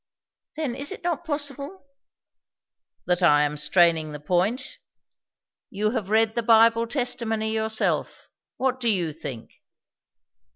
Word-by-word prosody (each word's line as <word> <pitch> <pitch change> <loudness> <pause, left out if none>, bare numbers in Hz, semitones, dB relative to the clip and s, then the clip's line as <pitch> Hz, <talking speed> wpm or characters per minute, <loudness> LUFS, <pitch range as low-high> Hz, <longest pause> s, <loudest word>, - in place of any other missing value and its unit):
"Then, 300 -5 -2
is 280 +3 -3
it - - -8
not 345 -1 -2
possible 290 +2 -4 0.6
" - - -56
"That 180 0 +1
I 150 -4 +5
am 150 0 -1
straining 160 0 +2
the 150 - -7
point? 190 - -1 0.9
You 210 +2 -1
have 215 -5 -3
read 220 +1 +3
the 235 - 0
Bible 230 0 +4
testimony 230 -4 -2
yourself; 220 0 -1 0.3
what 260 0 0
do 240 -2 +1
you 175 -7 0
think?" 130 -7 -9
220 Hz, 130 wpm, -24 LUFS, 175-260 Hz, 0.9 s, I